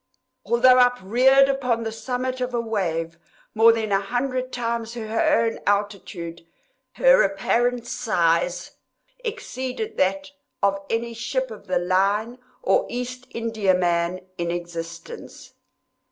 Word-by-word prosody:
Although 255 +2 +5
upreared 250 +3 +4
upon 250 -4 0
the 225 - -3
summit 255 +3 -3
of 250 -1 -2
a - - +1
wave 170 -7 -2 0.3
more 225 +1 +7
than 220 -2 -2
a 195 0 +3
hundred 255 +4 -2
times 230 -1 -3
her 225 0 +1
own 225 - -2
altitude, 200 -5 -2 0.5
her - - +5
apparent 245 - +1
size 175 -7 0 0.5
exceeded 440 - -5
that 285 +10 0 0.3
of 195 0 +2
any 235 +1 -1
ship 245 +2 -2
of 215 - -11
the 185 -1 +1
line 200 +7 +1 0.2
or - - +2
East 250 +1 -5
Indiaman 185 -5 0
in 170 0 -1
existence. 170 - -7
230 Hz, 120 wpm, -23 LUFS, 190-250 Hz, 0.5 s, more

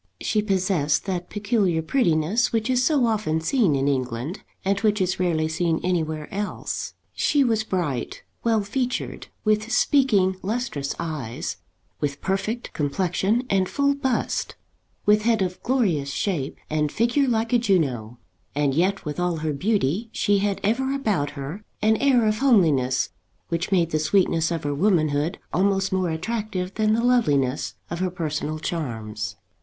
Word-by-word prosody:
She 215 - +1
possessed 185 -7 +1
that 180 -2 -3
peculiar 205 -6 +1
prettiness 175 - +2
which 225 +2 0
is 250 0 +2
so 280 -3 +3
often 210 -8 0
seen 180 - +2
in 135 0 +1
England, 130 - -2 0.2
and 200 +1 +2
which 210 -1 +2
is 185 -1 0
rarely 165 -3 +1
seen 160 0 0
anywhere 160 -4 -1
else. 205 +1 -4 0.2
She 290 -2 +2
was 225 -4 +1
bright, 175 - -3 0.2
well 225 -3 +2
featured, 250 +5 -3 0.2
with 215 +1 +1
speaking 210 -12 +3
lustrous 195 - -2
eyes, 150 -9 -4 0.4
with 145 -1 -2
perfect 205 +5 -2
complexion, 185 - 0
and 190 -4 +1
full 280 0 +2
bust, 265 -3 -1 0.5
with 210 +1 +5
head 225 -2 +2
of 180 -1 -4
glorious 195 - +1
shape 145 -3 -2
and 150 -1 0
figure 240 +5 +2
like 230 -1 0
a 240 - +5
Juno; 135 - 0 0.4
and 145 -2 +1
yet 185 +6 +1
with 150 +2 -4
all 180 -1 +1
her 155 -1 -2
beauty 200 - 0
she 205 -2 +2
had 200 0 0
ever 265 +6 +1
about 205 - 0
her 150 +10 -6 0.2
an 220 +1 +3
air 255 -4 +3
of 215 0 +1
homeliness 155 - +3 0.4
which 170 +2 -2
made 170 -3 +2
the 155 - +1
sweetness 165 0 +2
of 165 -2 -3
her 145 0 -1
womanhood 155 -2 +1 0.2
almost 195 0 +2
more 185 -2 +1
attractive 190 +2 -3
than 215 -1 +2
the 230 +1 +1
loveliness 145 - +2 0.2
of 170 - -3
her 185 0 0
personal 155 -3 -3
charms. 110 -10 -4
185 Hz, 155 wpm, -24 LUFS, 155-220 Hz, 0.5 s, with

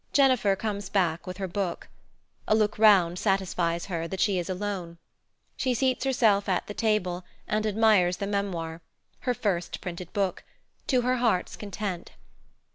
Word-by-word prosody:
Jennifer 255 -8 +4
comes 200 -1 -4
back 180 -4 0
with 185 0 -5
her 195 -1 -3
book. 185 -1 -3 0.6
A 215 - +4
look 215 -1 +1
round 185 -5 +5
satisfies 180 -4 0
her 170 -3 -3
that 190 +2 -5
she 195 -2 +2
is 175 - -4
alone. 185 -3 -4 0.6
She 255 -2 0
seats 260 +1 +1
herself 215 -7 +3
at 180 - +1
the 210 - -6
table 185 -5 0 0.2
and 215 +1 0
admires 210 -4 +3
the 200 - -3
memoir 175 -5 -3 0.4
her 250 -1 -1
first 195 -7 -2
printed 180 -1 -7
book 195 -4 -1 0.4
to 255 -3 +3
her 250 +1 +1
heart's 230 -7 +1
content. 200 -3 -5
200 Hz, 155 wpm, -27 LUFS, 180-215 Hz, 0.6 s, round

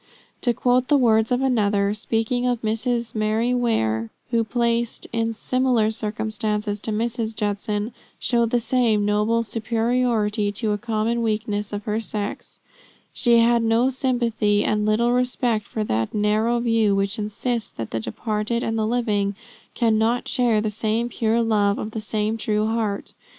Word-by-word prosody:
To 245 - +2
quote 250 +2 +1
the 290 - +4
words 220 -3 +3
of 250 +1 +2
another, 205 -5 +2
speaking 225 +3 -1
of 245 -2 -1
Mrs. 225 +1 -1
Mary 220 +3 +1
Ware, 115 - 0 0.2
who, 230 -1 +2
placed 235 +1 -1
in 230 0 0
similar 245 -1 +1
circumstances 210 -1 -2
to 220 - -3
Mrs. 225 0 -2
Judson, 210 +1 -2 0.2
showed 235 -2 +1
the 245 - +2
same 230 -3 +2
noble 210 +3 +1
superiority 225 -2 0
to 215 +1 -1
a 205 - -1
common 230 +1 -1
weakness 210 -2 -1
of 205 0 -4
her 215 +1 -1
sex: 210 -2 -5 0.5
"She 240 -3 +4
had 235 0 +4
no 230 +3 +2
sympathy 235 -5 +1
and 210 0 +1
little 235 +3 +2
respect 245 -3 0
for 215 - -3
that 110 - -1
narrow 215 +3 +2
view 225 -4 +2
which 195 +3 -1
insists 215 +2 -2
that 115 -2 -6
the 115 - -1
departed 215 - -2
and 225 0 -1
the 215 - +1
living 210 -4 0 0.4
cannot 225 +1 +1
share 240 -5 +2
the 215 0 -1
same 225 +2 -1
pure 230 0 +1
love 205 -3 +2
of 215 - -4
the 220 - -4
same 215 +1 -1
true 215 -1 0
heart. 220 -2 -2
220 Hz, 155 wpm, -23 LUFS, 210-235 Hz, 0.5 s, the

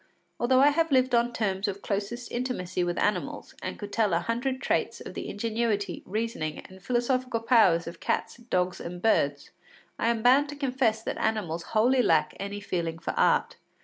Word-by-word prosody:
Although 255 +2 +4
I 285 - +7
have 325 +2 +1
lived 260 -1 +3
on 240 0 +3
terms 200 -4 -1
of 200 0 -5
closest 210 +4 -3
intimacy 185 -8 -2
with 175 0 -2
animals 210 - -1
and - - -5
could 205 -1 -8
tell 210 -5 +2
a - - +2
hundred 245 +6 -2
traits - - -1
of - - -8
the - - -5
ingenuity, 220 -1 -1
reasoning, 205 -7 -2
and 190 0 -15
philosophical 250 +2 0
powers 215 -8 +4
of 170 0 -8
cats, - - -2
dogs, 185 -7 -1
and 175 +1 -6
birds, 145 -9 +1 0.5
I - - +1
am 230 -1 +1
bound 270 +4 +5
to 290 - -6
confess 255 -6 0
that - - -4
animals 200 -7 -1 0.2
wholly 250 +4 +4
lack 160 -9 +2
any 200 +1 -4
feeling 170 -4 -2
for 165 - -3
art. - - +2
220 Hz, 180 wpm, -27 LUFS, 185-245 Hz, 0.5 s, I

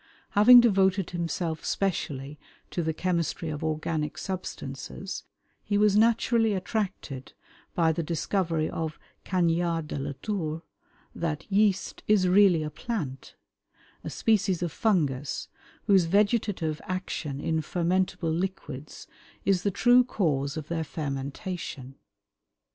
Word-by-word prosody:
Having 240 +4 +9
devoted 195 -4 +3
himself 170 -2 -2
specially 150 -7 -2 0.3
to 175 - -1
the 160 -1 0
chemistry 170 -1 -1
of 150 -1 -4
organic 155 -1 -2
substances, 185 -1 -6 0.4
he 205 - 0
was 205 -1 +4
naturally 225 0 +3
attracted 185 - -3 0.4
by 165 -2 +3
the 160 - -1
discovery 165 0 0
of 160 -1 -4 0.3
Cagniard 170 -2 +1
de 145 - -4
la 140 +1 -3
Tour, 165 -6 -2 0.5
that 160 -3 -3
yeast 195 -1 +2
is 205 -3 +4
really 180 -3 +5
a 150 - -4
plant, 150 - -5 0.7
a - - -4
species 200 -5 +1
of 170 - -2
fungus, 145 - 0 0.4
whose 195 -4 +5
vegetative 200 -4 +1
action 180 -6 -3
in 160 +2 0
fermentable 175 -1 0
liquids 160 -5 -5 0.4
is 190 -2 +3
the 200 - +1
true 245 +5 +5
cause 150 - -1
of 155 -2 -5
their 165 -1 -2
fermentation. 140 -1 -5
170 Hz, 120 wpm, -27 LUFS, 155-195 Hz, 0.7 s, Having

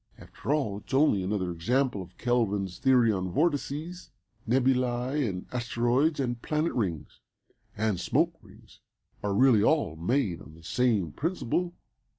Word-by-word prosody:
After - - -6
all 130 -10 0
it's 115 +5 -5
only 135 -8 +4
another 95 -1 -1
example 120 +6 0
of 90 0 -12
Kelvin's 105 -7 0
theory 125 -4 +4
of 95 -3 -1
vortices. 155 - -2 0.4
Nebulæ, 125 +1 +1
and 90 -1 -5
asteroids, 125 +5 +1
and 120 -3 -2
planet 155 +2 -1
rings, 85 -10 -3 0.6
and 105 -4 0
smoke - - +1
rings - - -18 0.4
are 100 -1 -1
really 125 -3 +5
all 140 - +2
made 90 - 0
on 75 +3 -13
the 80 - -17
same 105 -5 +1
principle." 175 - -2
120 Hz, 140 wpm, -28 LUFS, 100-135 Hz, 0.6 s, really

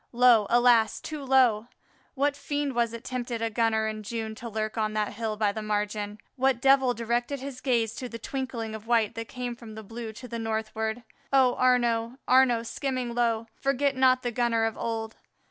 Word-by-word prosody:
Low, 240 -4 +5
alas! 240 -2 +4
too 305 -2 -6
low! 250 -5 +3 0.5
What 285 +1 +1
fiend 285 -1 -2
was 235 -1 +1
it 230 0 -8
tempted 245 -2 -4
a 225 0 -1
gunner 220 -1 +1
in 215 0 -4
June 220 +1 -4
to 235 +2 -8
lurk 215 0 -3
on 215 -1 -1
that 215 -1 -1
hill 220 0 -3
by 210 -1 +2
the 220 - -5
margin? 210 0 -2 0.2
what 265 -1 +2
devil 265 -1 +4
directed 240 +4 -1
his 265 -1 -7
gaze 230 -4 +1
to 250 - -5
the 230 - -6
twinkling 235 -2 -4
of 220 0 -8
white 230 -3 +2
that 230 0 -6
came 245 0 -5
from 230 -2 -11
the 220 - -8
blue 225 +2 -7
to 250 +3 -10
the 235 -1 -5
northward? 220 +1 -3 0.3
Oh, 260 -2 +4
Arnaux, 240 -1 +2
Arnaux, 250 -3 +4
skimming 255 0 -3
low, 230 -2 +1
forget 275 0 0
not 255 -1 +4
the 245 - -1
gunner 235 -1 +1
of 225 - -2
old! 225 -1 -4
235 Hz, 195 wpm, -27 LUFS, 220-255 Hz, 0.5 s, Low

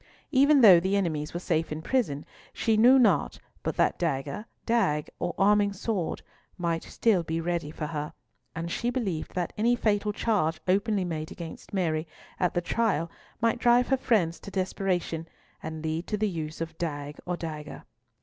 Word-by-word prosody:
Even 280 0 +5
though 190 -7 +9
the 190 +3 0
enemies 155 -6 -1
were 175 - -4
safe 165 -3 -1
in 155 +1 -4
prison, 165 - 0 0.3
she 225 -2 +1
knew 245 +5 +7
not 205 - +3 0.2
but - - -3
that - - +2
dagger, 140 - -2 0.2
dagg, 150 -11 +1
or 175 - -2
arming 205 0 +4
sword 195 -3 -2 0.3
might 170 -2 -1
still 215 -6 +1
be 165 0 -3
ready 170 -2 -2
for 150 - -5
her, 150 -1 -4 0.4
and 165 +1 -4
she 235 - -1
believed 205 -11 -3
that 175 -2 -2
any 235 +3 +4
fatal 210 -2 +1
charge 190 -8 0
openly 200 +1 +2
made 155 -2 -4
against 165 -2 -9
Mary 165 -4 0 0.3
at 180 -2 +1
the 175 - +2
trial 175 -4 0 0.3
might 230 +1 +2
drive 245 +1 +4
her 270 - +3
friends 190 -10 +1
to - - -9
desperation 185 -3 -2 0.3
and 160 0 -6
lead 160 +2 -2
to 210 - -1
the 215 +1 +1
use 160 -3 -5
of 165 0 -4
dagg 145 -3 -4
or 180 0 -1
dagger. 155 -3 -6
175 Hz, 175 wpm, -28 LUFS, 160-215 Hz, 0.4 s, though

